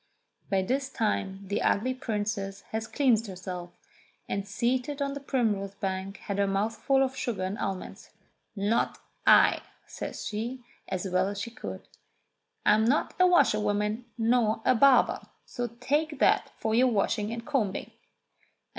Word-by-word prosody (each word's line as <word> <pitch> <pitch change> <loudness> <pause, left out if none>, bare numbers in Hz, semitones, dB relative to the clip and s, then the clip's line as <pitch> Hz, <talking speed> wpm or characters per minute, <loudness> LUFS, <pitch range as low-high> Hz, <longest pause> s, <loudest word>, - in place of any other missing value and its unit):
By 195 -2 +2
this 265 +6 -1
time 200 -5 -2
the 200 - -1
ugly 250 +6 +2
princess 205 -5 -3
had 220 0 -3
cleansed 235 -6 +3
herself, 180 -2 -6 0.6
and 200 0 -3
seated 250 +6 -1
on 280 0 -1
the 285 - -5
primrose 215 -8 -1
bank 195 0 -3
had 200 0 -2
her 200 - +3
mouth 200 +3 0
full 270 -1 +2
of 265 0 -2
sugar 220 -8 -2
and 190 +2 -2
almonds. 190 -2 -5 0.5
"Not 205 +3 0 0.3
I," - - +6 0.2
says - - -6
she 235 +4 -4 0.2
as 185 +1 -3
well 185 +1 +1
as 200 0 -4
she 230 +3 -4
could. 230 - -8 0.8
"I'm 215 +1 +5
not 260 +7 +2
a 365 - +7
washerwoman 210 - +2
nor 225 -1 +2
a 255 - +5
barber. 260 +1 +5 0.3
So 245 -1 -3
take 300 +1 0
that - - +3
for 220 - -1
your 250 +3 +5
washing 210 -1 0
and 230 0 -5
combing." 255 -10 -1
220 Hz, 150 wpm, -28 LUFS, 200-255 Hz, 0.8 s, a